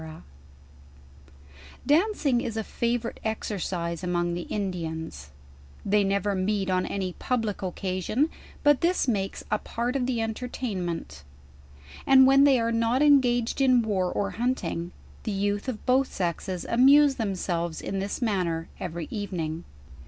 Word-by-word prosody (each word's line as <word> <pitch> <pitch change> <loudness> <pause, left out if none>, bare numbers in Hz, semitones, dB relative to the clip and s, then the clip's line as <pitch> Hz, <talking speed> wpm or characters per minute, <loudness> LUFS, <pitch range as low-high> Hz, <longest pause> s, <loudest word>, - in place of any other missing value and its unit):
Dancing 300 - +2
is 230 -2 -4
a 220 - -1
favorite 235 +1 -2
exercise 185 -6 -3
among 175 -1 0
the 175 0 -5
Indians: 160 - -4 0.6
they 205 +1 +3
never 200 +1 0
meet 195 0 0
on 185 0 +1
any 190 -2 -3
public 225 -5 -1
occasion, 185 - -1 0.4
but 290 -2 +4
this 345 -3 +2
makes 195 -5 -1
a 215 - +2
part 240 +3 -3
of 255 -2 0
the 250 -3 -1
entertainment; 205 - -4 0.8
and 265 -1 +8
wh.*n 275 +1 +6
they 270 -3 +5
are 230 0 0
not 230 +4 +2
engaged 250 -4 +3
in 255 -3 +4
war 190 -4 0
or 200 -1 -1
hunting, 185 -8 -2 0.3
the 215 - -3
youth 205 +4 -1
of 225 -4 -6
both 260 +1 +2
sexes 180 0 -3
amuse 275 +3 +5
themselves 175 -6 -2
in 195 - -3
this 200 +5 -3
manner 175 -7 -1
every 170 -2 -5
evening. 170 -6 -4
205 Hz, 135 wpm, -26 LUFS, 180-245 Hz, 0.8 s, and